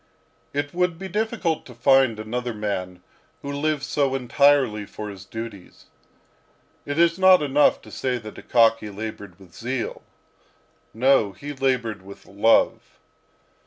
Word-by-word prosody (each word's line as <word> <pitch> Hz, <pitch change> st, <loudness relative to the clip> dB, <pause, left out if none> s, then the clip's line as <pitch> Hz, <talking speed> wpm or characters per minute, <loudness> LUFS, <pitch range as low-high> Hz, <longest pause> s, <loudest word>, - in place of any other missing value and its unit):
It 145 Hz, 0 st, -3 dB
would 180 Hz, -1 st, 0 dB
be 190 Hz, +2 st, -6 dB
difficult 210 Hz, -4 st, -1 dB
to 125 Hz, -, -12 dB
find 130 Hz, -1 st, +3 dB
another 120 Hz, +2 st, -4 dB
man 90 Hz, -4 st, -4 dB, 0.4 s
who 140 Hz, -, -4 dB
lived 150 Hz, 0 st, -1 dB
so 140 Hz, -2 st, 0 dB
entirely 130 Hz, -3 st, +3 dB
for 105 Hz, +1 st, -8 dB
his 95 Hz, -1 st, -11 dB
duties. 110 Hz, -3 st, -9 dB, 1.0 s
It 145 Hz, +1 st, -3 dB
is 170 Hz, +1 st, +3 dB
not 185 Hz, -3 st, +6 dB
enough 145 Hz, +1 st, +3 dB
to -, -, -13 dB
say 130 Hz, -1 st, -2 dB
that 110 Hz, -2 st, -9 dB
Akaky 115 Hz, -2 st, +2 dB
laboured 105 Hz, -3 st, -7 dB
with 90 Hz, -3 st, -17 dB
zeal; 125 Hz, +1 st, -4 dB, 0.9 s
no, 115 Hz, -4 st, +2 dB
he 145 Hz, +9 st, -7 dB
laboured 130 Hz, -6 st, -1 dB
with 100 Hz, +1 st, -13 dB
love. 105 Hz, +3 st, +1 dB
125 Hz, 135 wpm, -23 LUFS, 105-145 Hz, 1.0 s, not